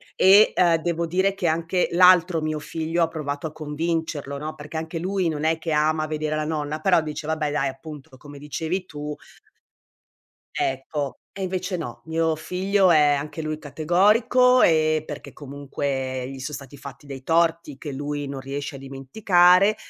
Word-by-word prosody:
e 200 +3 +6
ehm 170 -2 +4
devo 170 0 -1
dire 190 +3 +1
che 190 -3 -2
anche 165 +3 0
l'altro 180 -1 +5
mio 155 0 -2
figlio 165 +2 -3
ha - - +2
provato 150 -2 -4
a 155 - -9
convincerlo, 155 -2 -3
no, 155 +2 -5
perché 150 +2 -8
anche 160 +1 -4
lui 185 0 -1
non 150 -2 -4
è 160 0 +2
che 160 0 -4
ama 155 +1 +1
vedere 155 0 -2
la 155 - -1
nonna, 155 -1 -3
però 180 -1 +4
dice 150 0 -6
vabbè 155 -2 -1
dai 140 -2 0
appunto 145 +1 -10
come 145 +1 -12
dicevi 160 +6 -3
tu 150 -1 -6 1.4
ecco. 135 +1 -2 0.2
E 195 - -6
invece 185 0 -2
no, 120 -8 -7
mio 160 0 0
figlio 185 +3 +1
è 150 -2 +5
anche 150 +3 -5
lui 155 0 -3
categorico 210 - +3
e 155 -1 +3
perché 150 -2 -9
comunque 135 -2 -4
gli 135 - -8
sono 130 +3 -6
stati 140 0 -11
fatti 140 +1 -11
dei 135 -2 -8
torti 165 -2 +1
che 150 - -6
lui 145 +1 -4
non 140 -1 -5
riesce 140 +1 -5
a - - -7
dimenticare 175 +8 +3
155 Hz, 170 wpm, -23 LUFS, 145-170 Hz, 1.4 s, e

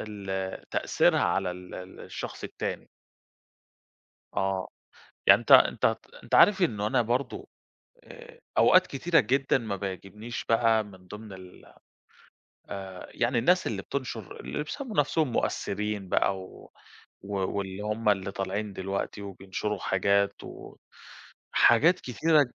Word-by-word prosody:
على - - -4
ال 95 -2 -5
تأثيرها - - +2
على 95 -2 +1
ال 90 0 -9
ال 90 +1 -9
الشخص - - -7
التاني. - - -5 1.5
آه، 95 -1 -1 0.6
يعني - - +8
أنتَ - - +1
أنتَ - - +6 0.3
أنتَ - - -2
عارف 195 -2 +6
إنه 105 -10 +1
أنا 125 +2 +2
برضه 120 +4 -2 0.6
آآ، 485 0 -14 0.2
أوقات 185 0 +6
كتيرة 165 +5 +2
جدًا 135 +5 +2
ما 110 -5 -4
بيعجبنيش 100 +4 -6
بقى 115 -1 +3
من 95 -3 -15
ضمن 105 +1 -10
ال 95 -1 -12 1.1
آآ، 95 -2 -7
يعني 120 0 +1
الناس 180 +10 +3
اللي 100 -3 -3
بتنشر 120 -6 -5
اللي 150 - -4
بيسَموا 240 - -6
نفسهم 145 -1 +2
مؤثّرين 105 -4 -2
بقى، 95 - +2
و 95 - -13 0.5
و 100 +1 -6 0.2
واللِّي 95 0 -4
هُم 105 +1 0
اللى 100 -1 +1
طالعين 100 +2 -3
دلوقتي، 95 +2 -4
وبينشروا 100 +1 -4
حاجات، 100 +1 +1 1.2
وحاجات 165 +10 +5
كتيرة 150 +5 +3
105 Hz, 130 wpm, -28 LUFS, 95-125 Hz, 1.5 s, يعني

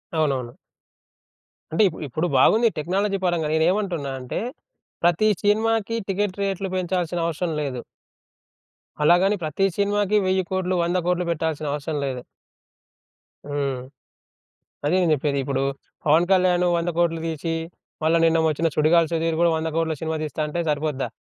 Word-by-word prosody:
అవునవును. 135 -6 -1 1.1
అంటే 165 +7 +3
ఇపు 160 - -10
ఇప్పుడు 155 +7 -1
బాగుంది 225 - +5
టెక్నాలజీ 195 +5 0
పరంగా. 170 -3 +1
నేనేమంటున్నా 170 -3 0
అంటే, 125 -1 -4 0.6
ప్రతి 175 +5 +3 0.2
సినిమాకి 220 +1 +1
టికెట్ 200 0 -1
రేట్లు 195 -1 -2
పెంచాల్సిన 175 -1 -1
అవసరం 170 +1 -2
లేదు. 130 -4 -3 1.2
అలాగని 180 +6 +4
ప్రతి 155 +5 0
సినిమాకి 205 0 +2
1000 185 0 +2
కోట్లు, 185 0 0
100 175 +2 0
కోట్లు 180 0 +1
బెట్టాల్సిన 155 -2 -2
అవసరం 150 +1 -3
లేదు. 130 -2 -3 1.2
హ్మ్. 140 -3 -2 1.1
అదే 155 - +2
నేను 170 -3 +3
జెప్పేది. 140 0 -1
ఇప్పుడు 135 0 -1 0.4
'పవన్ 160 +4 +4
కళ్యాణ్' 180 -1 +3
100 170 +1 -1
కోట్లు 165 -1 +1
దీసి, 165 +1 -2 0.5
మళ్ళా 165 +1 +4
నిన్న 165 0 +3
వచ్చిన 160 +2 0
సుడిగాలి 160 +2 +4
సుధీర్ 165 0 0
గూడా 170 - +4
100 160 0 -2
కోట్లు 160 -1 0
సినిమా 160 0 -1
తీస్తా 155 +1 -5
అంటే 170 +3 -2
సరిపోద్దా? 150 -2 -1
165 Hz, 135 wpm, -23 LUFS, 155-185 Hz, 1.2 s, బాగుంది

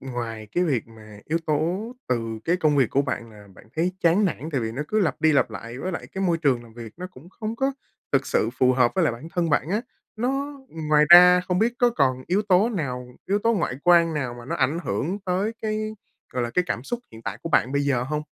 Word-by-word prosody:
ngoài 115 -5 -5
cái 180 - +2
việc 135 -9 0
mà 110 -2 -14
yếu 165 +2 0
tố 175 +10 -1 0.2
từ 115 -2 -1
cái 175 +2 +2
công 155 -4 +2
việc 130 -5 +3
của 140 - +2
bạn 115 -4 -4
là 105 -1 -15
bạn - - -16
thấy 175 +3 +1
chán 175 +5 +4
nản 160 -3 -2
tại 135 - 0
vì 110 -1 -3
nó 135 +5 -3
cứ 215 - +1
lặp 185 - 0
đi 160 0 +4
lặp 140 - +2
lại, 120 +2 -8
với 185 +5 -3
lại - - -5
cái 195 0 -2
môi 170 -2 +1
trường 130 -6 +1
làm 115 - -15
việc 115 -2 -9
nó 180 +1 -6
cũng 150 +5 -15
không 220 +3 -5
có 270 +2 0 0.4
thực 135 0 +2
sự 115 -6 +1
phù 130 0 +4
hợp 125 -2 +3
với - - +2
lại - - +2
bản 130 +8 -9
thân 170 -2 0
bạn 150 +1 +1
á, 210 +3 +1 0.4
nó 275 +5 -2 0.3
ngoài 150 0 +5
ra 180 +1 +9
không 180 0 -1
biết 225 +4 +2
có 245 -1 +4
còn 130 - +1
yếu 195 +4 +1
tố 200 +2 +3
nào 130 - -3 0.2
yếu 200 +2 +2
tố 230 +2 +2
ngoại 170 -9 -1
quan 170 -2 +5
nào 130 -5 -2
mà 120 - -10
nó 130 - -3
ảnh 140 +5 +1
hưởng 165 - -2
tới 190 +5 0
cái, 215 0 -2 0.4
gọi 125 - -1
là, 120 - -2
cái 180 +8 +1
cảm 120 - -2
xúc 240 - -4
hiện 110 - -12
tại 110 -1 -5
của 165 - -4
bạn 130 -4 +2
bây 145 0 +1
giờ 140 -4 +1
hông? 150 +4 -2
155 Hz, 260 wpm, -24 LUFS, 125-185 Hz, 0.4 s, ra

